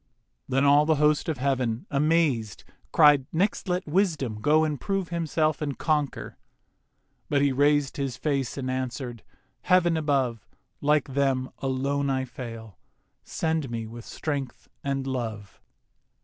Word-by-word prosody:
Then 135 +2 +2
all 145 +2 +5
the 160 - +4
host 150 +2 +2
of 155 - -1
heav'n, 125 -3 -1
amazed, 145 - +1 0.3
Cried, 145 -4 +5
'Next 190 +3 0
let 180 +1 0
Wisdom 150 - 0
go 155 +6 +4
and 150 -3 -2
prove 195 -4 -2
Himself 160 -3 0
and 145 -3 -3
conquer.' 150 -4 -1 0.9
But 140 -1 +2
he 140 - +3
raised 145 +1 +2
His 135 -3 -3
face 140 -4 -1
and 130 -1 -2
answer'd, 130 -2 -4 0.4
'Heav'n 175 -2 +3
above, 135 - 0 0.3
Like 145 -2 +2
them, 135 -2 +1
alone 140 +1 -1
I 130 -1 0
fail; 115 - -9 0.4
send 160 -2 -1
with 125 - -8
me 115 +1 -5
Strength 140 0 -5
and 135 -1 -2
Love. 115 -6 -5
140 Hz, 135 wpm, -26 LUFS, 130-155 Hz, 0.9 s, all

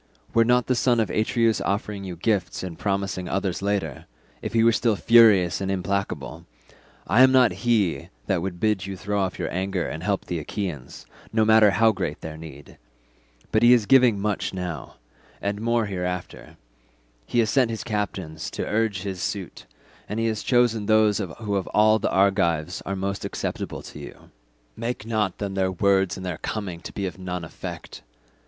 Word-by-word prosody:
Were 115 - +5
not 125 +1 +3
the 130 - +1
son 120 -1 +2
of 110 -4 0
Atreus 115 +1 +1
offering 100 0 -2
you 90 -2 -6
gifts 95 -1 -1
and 90 -3 -5
promising 100 -2 -2
others 95 -2 -1
later—if 100 -8 -5
he 115 -1 +4
were 115 - +6
still 115 -1 +1
furious 100 -6 +5
and 95 - -2
implacable—I 95 - -3
am 130 0 +7
not 130 -4 +5 0.2
he 100 - +1 0.2
that 95 -3 0
would 90 -1 -4
bid 105 -3 0
you 95 -1 -5
throw 100 +2 -1
off 95 -1 -2
your - - -3
anger 95 -1 -1
and 80 - -5
help 100 +2 -1
the 85 - -3
Achaeans, 80 - -6 0.3
no 110 -1 +2
matter 110 -1 +6
how 110 +4 +4
great 100 - -4
their 80 -1 -7
need; 75 -3 -12 0.7
but 110 - +3
he 120 +1 +7
is 120 -4 +3
giving 125 -4 +5
much 100 -1 -2
now, 90 -5 -5 0.4
and 100 +1 -3
more 115 0 +1
hereafter; 90 -2 -5 0.7
he - - -2
has 110 -3 +3
sent 130 -4 +3
his 110 -1 -4
captains 100 -7 -4
to - - -4
urge 105 -4 0
his 95 -3 -4
suit, 95 -2 -5 0.4
and 105 +2 -3
has 115 -2 0
chosen 120 -4 +2
those 110 -1 +4
who 100 +2 -4
of 95 - -1
all 110 +1 +5
the 110 - 0
Argives 90 -4 +1
are 95 - -2
most 100 +1 -3
acceptable - - -4
to - - -10
you; - - -12 0.4
make 115 -1 -4
not 110 -5 -1
then 100 -2 -4
their 95 -1 0
words 95 0 +2
and 95 - -7
their 90 -3 -4
coming 95 -6 -4
to - - -8
be 100 - -4
of 90 -3 -6
none 90 -1 -4
effect. 80 - -8
100 Hz, 180 wpm, -24 LUFS, 90-110 Hz, 0.7 s, am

